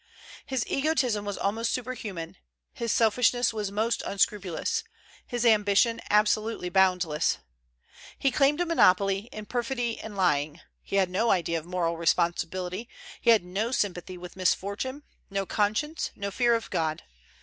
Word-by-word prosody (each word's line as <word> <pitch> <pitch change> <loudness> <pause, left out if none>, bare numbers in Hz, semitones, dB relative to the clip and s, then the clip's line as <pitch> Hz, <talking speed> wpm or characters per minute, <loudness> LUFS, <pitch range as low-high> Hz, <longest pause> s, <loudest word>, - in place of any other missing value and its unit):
His 265 -4 -1
egotism 265 -8 0
was 205 -1 -3
almost 225 +4 -1
superhuman, 210 -9 -5 0.4
his 235 -2 -2
selfishness 240 +1 +3
was 210 -3 -3
most 220 +3 0
unscrupulous, 195 -3 -1 0.4
his 245 -1 -2
ambition 215 +1 +4
absolutely 215 -2 +2
boundless. 180 -4 +2 0.8
He 275 - +1
claimed 280 +4 +3
a 350 - +2
monopoly 195 - +3
in 215 0 -7
perfidy 240 0 -2
and 210 -2 -8
lying; 155 -4 +1 0.2
he - - -5
had 190 -2 +2
no 225 +5 +1
idea 170 -4 +1
of 155 - -14
moral 170 -2 -1
responsibility; 180 +5 0 0.3
he 235 - +2
had 220 -6 +5
no 200 +6 -2
sympathy 185 -6 -2
with 180 0 -10
misfortune, 200 +9 -1 0.3
no 195 0 -2
conscience, 215 - -1
no 200 0 -4
fear 240 +2 +3
of 230 -3 -4
God. 155 -1 -1
205 Hz, 140 wpm, -27 LUFS, 180-235 Hz, 0.8 s, had